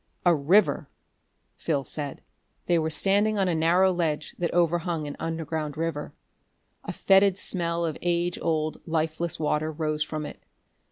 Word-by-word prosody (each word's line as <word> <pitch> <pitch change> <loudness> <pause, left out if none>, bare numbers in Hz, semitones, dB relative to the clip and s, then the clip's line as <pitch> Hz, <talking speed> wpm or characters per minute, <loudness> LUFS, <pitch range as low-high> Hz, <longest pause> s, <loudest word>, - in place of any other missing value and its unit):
"A 175 - +6
river!" 165 +8 +3 0.7
Phil 145 -4 -1
said. 145 0 -6 0.4
They 175 -1 +3
were 160 0 0
standing 205 +6 +2
on 195 -1 +2
a 180 - +1
narrow 175 +4 +3
ledge 160 -4 -2
that 175 - 0
overhung 170 -2 +1
an 145 - -6
underground 160 -2 -3
river. 160 -2 -3 0.7
A - - -4
fetid 195 0 +4
smell 170 -3 -1
of 160 -2 -3
age 175 0 0
old, 155 -1 -1
lifeless 160 +1 -1
water 155 0 0
rose 155 -1 -2
from 155 0 -2
it. - - -9
165 Hz, 150 wpm, -26 LUFS, 155-175 Hz, 0.7 s, A